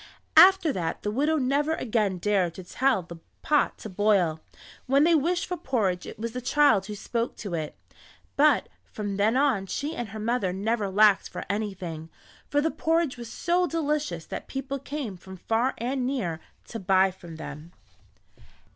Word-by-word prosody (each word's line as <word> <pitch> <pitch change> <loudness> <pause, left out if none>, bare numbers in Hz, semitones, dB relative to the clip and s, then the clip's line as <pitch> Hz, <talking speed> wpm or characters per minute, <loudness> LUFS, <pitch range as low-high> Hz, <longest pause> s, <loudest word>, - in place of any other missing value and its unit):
After 370 -5 +7
that 170 -6 -3
the 210 - -1
widow 295 +7 +1
never 285 +3 +1
again 215 -8 0
dared 185 -2 0
to 185 - -8
tell 250 +2 +1
the 170 0 -10 0.3
pot 295 -1 +2
to - - -8
boil. 190 -5 +2 0.5
When 275 +3 +4
they 335 +2 +4
wished 340 +3 +1
for 360 - -4
porridge 195 - -1
it - - -9
was 230 +2 -4
the 250 +2 -5
child 255 -7 +3
who 210 - -5
spoke 230 +3 -3
to 200 -5 -6
it. 155 -3 -3 0.6
But 290 -2 +4 0.2
from 205 -2 -5
then 215 +5 +2
on 260 -9 +2
she 295 - -3
and 240 -3 -4
her 215 +2 -7
mother 220 -3 0
never 205 +1 -1
lacked 205 0 +4
for - - -6
anything, 185 -6 -4 0.4
for 290 - +2
the 320 +2 0
porridge 320 -1 0
was 235 -1 -8
so 355 +1 +1
delicious 300 - -2
that - - -7
people 275 +1 -4
came 270 -8 -5
from 190 +1 -11
far 225 +7 0
and 250 +2 -2
near 190 -12 -2 0.3
to 230 - -5
buy 190 0 +3
from 175 -3 -12
them. 155 +1 -9
225 Hz, 175 wpm, -26 LUFS, 190-280 Hz, 0.6 s, After